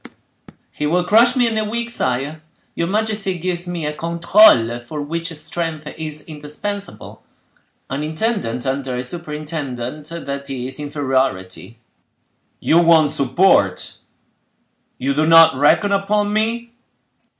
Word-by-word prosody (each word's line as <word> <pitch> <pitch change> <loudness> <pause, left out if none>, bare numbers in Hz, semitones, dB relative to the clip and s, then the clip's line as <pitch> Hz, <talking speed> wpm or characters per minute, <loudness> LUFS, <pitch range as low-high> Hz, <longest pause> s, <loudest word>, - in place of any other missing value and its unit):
"He 150 - -3
will 175 +3 +2
crush 230 +6 +4
me 250 -2 +3
in 220 -1 0
a - - 0
week, 235 +1 -2
sire. 140 - -2 0.3
Your 170 - -2
majesty 210 -2 -1
gives 175 0 -3
me 175 -3 -4
a 150 - -2
controle 165 - +4
for 120 +6 -7
which 165 +4 -3
strength 155 0 -4
is 155 -1 -5
indispensable. 160 +7 -6 0.7
An 135 +2 -4
intendant 155 - -2
under 130 -1 -2
a 125 - -3
superintendent,—that 150 -1 -5
is 130 +1 -4
inferiority." 130 -8 -2 0.8
"You 165 - +3
want 165 -3 +5
support—you 130 - -1
do 155 +2 +1
not 165 -3 +7
reckon 160 +8 +3
upon 205 +1 +1
me?" 230 +2 -1
155 Hz, 115 wpm, -19 LUFS, 140-185 Hz, 0.8 s, not